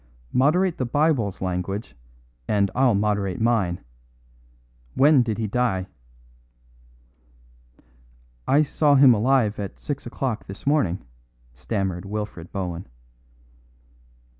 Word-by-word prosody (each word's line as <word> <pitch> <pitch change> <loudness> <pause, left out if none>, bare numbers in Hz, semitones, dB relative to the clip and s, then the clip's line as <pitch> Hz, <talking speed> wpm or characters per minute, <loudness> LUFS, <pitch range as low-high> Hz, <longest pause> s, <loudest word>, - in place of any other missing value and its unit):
"Moderate 170 +7 +2
the 130 - 0
Bible's 125 - 0
language, 95 +3 -3 0.5
and 100 -2 +1
I'll 130 -4 +3
moderate 100 -2 0
mine. 110 -7 +1 1.1
When 145 -1 +5
did 115 -3 -2
he 110 - -2
die?" 105 -4 0 2.6
"I 145 +3 +4
saw 145 0 +2
him 135 -2 +7
alive 115 -1 +2
at 100 -1 -6
six 145 -4 -5
o'clock 120 -2 -3
this 95 - -10
morning," 135 - +1 0.5
stammered 90 - -3
Wilfred 105 -4 -6
Bohun. 90 -3 -4
110 Hz, 100 wpm, -24 LUFS, 95-135 Hz, 2.6 s, him